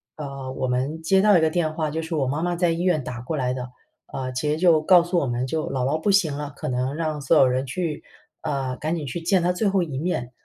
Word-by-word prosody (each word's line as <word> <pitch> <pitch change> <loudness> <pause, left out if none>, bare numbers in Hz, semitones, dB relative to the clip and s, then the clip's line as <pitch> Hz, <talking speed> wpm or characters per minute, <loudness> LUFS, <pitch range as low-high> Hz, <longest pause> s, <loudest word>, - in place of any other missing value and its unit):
呃， 140 -3 -6
我 130 - -2
们 135 +6 -1
接 190 +4 +3
到 205 -3 +6
一 - - +2
个 160 - +3
电 155 -2 0
话， 155 -2 -1
就 160 +1 -2
是 160 0 -4
我 135 -4 0
妈 145 +4 -1
妈 175 0 0
在 175 0 +2
医 165 +1 -2
院 175 -6 +1
打 125 -1 -6
过 150 +5 -4
来 125 -1 0
的， 125 -1 -5 0.4
呃， 130 -1 -4
其 140 +4 -2
实 155 - 0
就 165 -3 +4
告 175 +1 +6
诉 175 0 0
我 140 - -1
们 120 +1 -1
就 155 +4 -2
姥 130 -2 -1
姥 155 +3 0
不 205 - 0
行 180 -8 +3
了， 145 0 -5
可 - - -5
能 130 +3 -1
让 155 -2 -2
所 150 +4 +3
有 135 - +6
人 130 +1 0
去 165 +1 -3 0.4
啊， 135 -4 -2
赶 155 +3 -2
紧 155 -3 -4
去 165 +6 -5
见 175 +1 +2
她 180 - +2
最 205 +3 0
后 190 -2 +2
一 140 -5 -4
面。 145 -8 -2
155 Hz, 300 characters per minute, -24 LUFS, 130-170 Hz, 0.4 s, 到